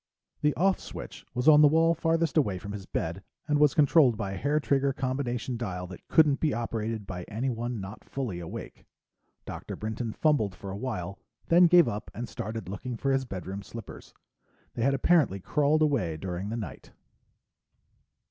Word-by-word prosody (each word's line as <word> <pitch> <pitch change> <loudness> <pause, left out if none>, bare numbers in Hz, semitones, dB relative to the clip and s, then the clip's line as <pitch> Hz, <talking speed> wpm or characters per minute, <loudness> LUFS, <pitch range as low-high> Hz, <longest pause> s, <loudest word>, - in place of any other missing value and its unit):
The 150 0 +2
"off" 190 +2 +2
switch - - -9
was 125 +4 -1
on 150 -1 +8
the 150 - +8
wall 165 +2 +4
farthest 165 -2 0
away 105 - +2
from 100 +3 -7
his 100 -2 -7
bed 85 +4 -3 0.3
and 150 -1 +2
was 150 -2 +4
controlled 145 -5 +5
by 100 -3 -3
a 95 - -4
hairtrigger 140 -2 +1
combination 130 -2 -2
dial 90 -6 -4
that 90 0 -11
couldn't 150 -3 +4
be 155 -3 +1
operated 115 -2 -3
by 90 -2 -6
anyone 120 0 -3
not 100 +2 -8
fully 120 -10 -4
awake. 90 +7 -8 0.6
Dr. - - -6
Brinton 110 +2 -4
fumbled 110 -9 +1
for 100 +1 -7
a - - -5
while, 100 -5 -4 0.3
then 175 +1 +7
gave 175 -3 +6
up 105 -2 -4
and 120 +1 -4
started 110 -2 -5
looking 115 +5 -5
for 135 +4 0
his 135 0 +1
bedroom 95 -2 -6
slippers. 115 +2 -10 0.6
They - - -4
had 135 +3 +3
apparently 135 - +3
crawled 150 +9 +2
away 115 - +1
during 90 +3 -4
the 115 - -3
night. 110 - -8
120 Hz, 175 wpm, -28 LUFS, 100-145 Hz, 0.6 s, on